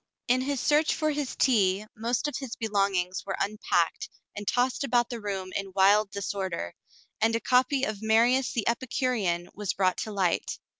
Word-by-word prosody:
In 255 +1 +3
his 280 0 -1
search 300 +4 +2
for 310 -1 0
his 290 -3 -3
tea, 205 -5 +2
most 235 +5 -1
of 295 - -4
his 265 -4 -6
belongings 195 -4 0
were 195 - -4
unpacked 200 -4 0 0.3
and 205 -1 -7
tossed 250 +2 +1
about 245 -3 +1
the 235 -2 -5
room 195 -2 -4
in 195 -1 -4
wild 200 +2 +5
disorder, 190 - -4 0.5
and 225 +1 +3
a - - +1
copy 255 +3 +2
of 215 -5 -2
Marius 235 +4 +3
the 230 - -2
Epicurean 230 -7 -1
was 205 -1 -3
brought 185 -2 +1
to 215 - -4
light. 190 -4 0
215 Hz, 170 wpm, -27 LUFS, 195-250 Hz, 0.5 s, wild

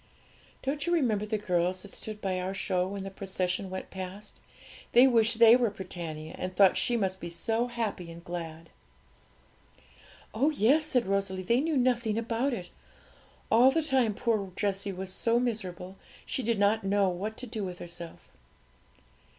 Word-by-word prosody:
'Don't 280 +3 -2
you 345 - +2
remember 220 -9 +1
the 215 0 0
girls 180 -2 0
that 205 - -9
stood 215 -1 -5
by 185 -2 -1
our 185 +2 -3
show 180 -1 0
when 195 0 -5
the 195 - -6
procession 190 -1 -2
went 185 0 -6
past? 190 +2 -8 0.5
They 245 +2 +8
wished 230 -3 +3
they 230 0 +8
were 245 -2 +2
Britannia, 170 -5 -7
and 185 0 -4
thought 195 0 +6
she 240 - +1
must 190 -3 -1
be 170 - -5
so 225 +7 -1
happy 225 -7 -3
and 165 0 -10
glad.' 165 -2 -7 1.6
'Oh 265 +7 +3
yes!' 295 +2 +3
said 250 -5 +2
Rosalie; 195 -1 -1
'they 235 +7 +2
knew 315 -1 0
nothing 240 -4 +1
about 230 +4 0
it. 185 -8 -5 0.8
All 240 +4 +7
the 320 +4 +1
time 260 -8 +2
poor 210 -5 0
Jessie 200 0 -1
was 190 0 -6
so 230 +3 +1
miserable 190 -6 -4 0.3
she - - -2
did 230 -2 0
not 205 +2 +2
know 200 0 +2
what 200 +5 -4
to 255 - -6
do 220 -3 -4
with 180 -2 -5
herself.' 170 -1 -9
205 Hz, 170 wpm, -29 LUFS, 185-235 Hz, 1.6 s, They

